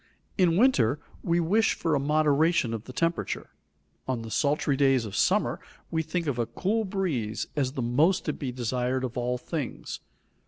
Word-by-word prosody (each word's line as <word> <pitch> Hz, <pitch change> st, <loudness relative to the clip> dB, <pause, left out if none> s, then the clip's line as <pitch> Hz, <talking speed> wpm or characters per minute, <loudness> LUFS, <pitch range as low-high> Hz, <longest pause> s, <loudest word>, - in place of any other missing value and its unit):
In 175 Hz, -4 st, +3 dB
winter 150 Hz, -, +4 dB, 0.2 s
we 170 Hz, 0 st, +1 dB
wish 205 Hz, +7 st, +2 dB
for 165 Hz, -, -1 dB
a 145 Hz, -, +3 dB
moderation 150 Hz, -1 st, +2 dB
of 115 Hz, 0 st, -5 dB
the -, -, -8 dB
temperature; 165 Hz, +6 st, -2 dB, 0.6 s
on 125 Hz, -3 st, -2 dB
the 115 Hz, -, -8 dB
sultry 145 Hz, +1 st, +1 dB
days 135 Hz, -3 st, +3 dB
of 100 Hz, -2 st, -6 dB
summer, -, -, +2 dB, 0.3 s
we 160 Hz, -, +1 dB
think 165 Hz, +2 st, -2 dB
of 135 Hz, -5 st, -1 dB
a 115 Hz, -, 0 dB
cool 210 Hz, -, -1 dB
breeze 140 Hz, -, -2 dB
as 135 Hz, -3 st, 0 dB
the 130 Hz, -, -2 dB
most 150 Hz, +10 st, +2 dB
to 150 Hz, -, 0 dB
be 135 Hz, -3 st, -4 dB
desired 125 Hz, +1 st, -1 dB
of 125 Hz, -2 st, -4 dB
all 125 Hz, 0 st, -1 dB
things. 145 Hz, +1 st, -5 dB
140 Hz, 180 wpm, -27 LUFS, 125-165 Hz, 0.6 s, winter